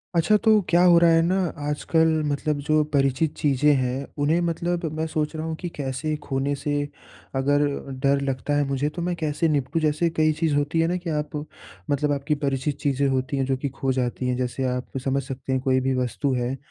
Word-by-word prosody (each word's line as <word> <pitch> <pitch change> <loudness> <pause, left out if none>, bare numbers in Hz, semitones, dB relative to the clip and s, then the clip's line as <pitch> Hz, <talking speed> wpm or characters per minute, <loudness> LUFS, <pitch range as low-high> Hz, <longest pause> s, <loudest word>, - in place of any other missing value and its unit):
अच्छा 170 +6 +4
तो 220 - +6 0.2
क्या 175 +1 +4
हो 175 -2 +7
रहा 170 - +5
है 165 0 +5
ना 175 +3 +1 0.3
आजकल 160 +2 +2 0.2
मतलब 145 0 -1
जो 155 0 +4
परिचित 140 +2 +2
चीज़ें 145 0 +3
हैं 130 +1 -2 0.2
उन्हें 160 +4 +3
मतलब 170 0 -1
मैं 160 - 0
सोच 155 0 -2
रहा 155 0 -3
हूँ 160 0 -3
कि 175 +2 -5
कैसे 145 +2 -2
खोने 135 +1 -1
से 145 - -1 0.6
अगर 145 +2 +2 0.4
डर 140 0 +3
लगता 135 +2 -2
है 145 - +3
मुझे 140 +2 0
तो - - -2
मैं 175 +1 -1
कैसे 155 0 0
निपटूँ। 145 +2 0
जैसे 155 +2 +1
कई 155 -1 +2
चीज़ 160 -3 +1
होती 145 +3 0
है 165 - +3
ना 180 +2 0
कि 170 - -3
आप 150 0 -5 0.6
मतलब 145 +1 +1
आपकी 145 +1 0
परिचित 140 +1 -1
चीज़ें 140 -1 +1
होती 135 +2 -1
हैं 135 - +1
जो 135 0 0
कि 140 +2 -3
खो 135 0 -2
जाती 125 0 -2
हैं। 125 -1 0
जैसे 125 +1 -2
आप 125 +1 -5
समझ 135 0 0
सकते 135 +1 -6
हैं 130 - 0
कोई 130 -1 +2
भी 130 +1 0
वस्तु 130 +3 -1
है 125 +1 -1
145 Hz, 215 wpm, -24 LUFS, 135-160 Hz, 0.6 s, हो